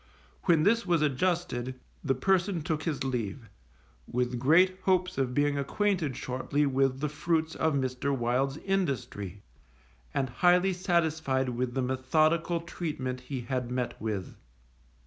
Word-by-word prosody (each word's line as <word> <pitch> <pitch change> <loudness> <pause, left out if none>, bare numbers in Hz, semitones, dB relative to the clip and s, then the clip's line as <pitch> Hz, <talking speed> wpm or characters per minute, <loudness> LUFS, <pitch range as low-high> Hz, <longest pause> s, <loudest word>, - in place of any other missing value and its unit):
When 165 -4 +4
this 230 +5 +3
was 170 -3 +2
adjusted, 135 -4 -1 0.2
the 135 -2 +1
person 180 +3 +1
took 155 -1 -1
his 150 -4 -2
leave, 120 -3 -3 0.6
with 125 0 -1
great 180 +8 +4
hopes 185 -3 +2
of 125 -2 0
being 145 0 +2
acquainted 170 - 0
shortly 130 +3 -1
with 135 -1 +1
the 150 - +1
fruits 160 +2 0
of 160 -2 +1
Mr. 130 0 -1
Wild's 130 +4 0
industry, 140 - -2 0.7
and 135 -1 -1
highly 180 +5 +4
satisfied 160 -7 +1
with 125 +1 -2
the 130 - +1
methodical 155 +6 +1
treatment 135 -7 -4
he 125 0 -5
had 125 0 -3
met 125 -1 -3
with. 105 -4 -3
140 Hz, 135 wpm, -29 LUFS, 125-170 Hz, 0.7 s, When